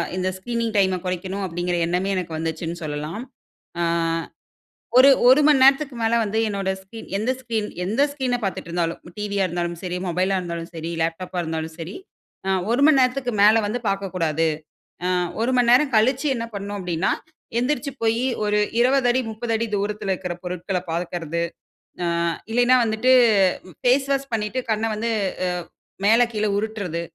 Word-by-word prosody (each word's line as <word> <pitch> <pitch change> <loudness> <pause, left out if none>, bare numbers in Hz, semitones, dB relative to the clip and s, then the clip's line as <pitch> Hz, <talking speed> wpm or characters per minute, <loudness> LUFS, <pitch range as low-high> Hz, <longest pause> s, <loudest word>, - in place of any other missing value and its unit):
"இந்த 185 0 0
screening 230 +2 -2
time 190 -2 +3
கொறைக்கணும்" 185 +2 -3
அப்டீங்குற 175 +1 -2
எண்ணமே 180 +3 0
எனக்கு 180 -3 -3
வந்துச்சுன்னு 165 +1 -3
சொல்லலாம். 150 +6 -4 0.6
ஆ, - - +2 1.2
ஒரு 275 +2 +9 0.2
1 260 +4 +7
மணி 275 -3 +5
நேரத்துக்கு 275 -1 +4
மேல 225 +1 +2
வந்து 215 +2 -2
என்னோட 195 -2 -2
ஸ்கிரீன் 220 +4 -11
எந்த 225 +5 0
ஸ்கிரீன் 225 -4 -2 0.2
எந்த 220 +9 +1
ஸ்கிரீன 260 -3 -1
பாத்துட்டுருந்தாலும், 170 -3 -2 0.2
டிவியா 200 -1 0
இருந்தாலும் 175 0 -3
சரி, 180 0 -2
மொபைலா 185 +3 +1
இருந்தாலும் 170 -1 -5
சரி, 165 +1 -5
லேப்டாப்பா 175 +3 -3
இருந்தாலும் 160 0 -4
சரி. 165 +4 -6 0.5
அ, - - +2 0.2
1 250 - +2
மணி 300 -4 +5
நேரத்துக்கு 255 0 0
மேல 220 +1 +6
வந்து 240 +4 -2
பாக்கக்கூடாது. 170 -5 0 0.6
அ, - - +1 0.3
1 245 - +1
மணி 245 -1 +3
நேரம் 265 +1 +4
கழிச்சு 260 +6 +2
என்ன 230 - -3
பண்ணனும் 200 0 -5
அப்டீன்னா, 175 0 0 0.5
எந்திரிச்சு 280 +2 -1
போயி 225 +2 +2 0.2
ஒரு 210 0 +1 0.2
20 255 +1 +3
அடி 255 - +2
30 230 +2 -4
அடி 230 - 0
தூரத்துல 205 -1 -2
இருக்குற 180 -1 -4
பொருட்கள 180 +1 -3
பாக்குறது. 170 -1 -3 0.6
அ - - 0 0.5
இல்லேன்னா 245 +2 +4
வந்துட்டு, 225 +3 +2 0.7
ஃபேஸ் 265 +2 +3
வாஷ் 275 0 -2
பண்ணிட்டு 220 +3 -1
கண்ண 220 +1 0
வந்து, 230 +2 -2 0.4
அ - - +1 0.6
மேல, 225 +3 +6
கீழ 215 0 0
உருட்றது. 205 -6 -3
205 Hz, 155 wpm, -23 LUFS, 175-240 Hz, 1.2 s, ஒரு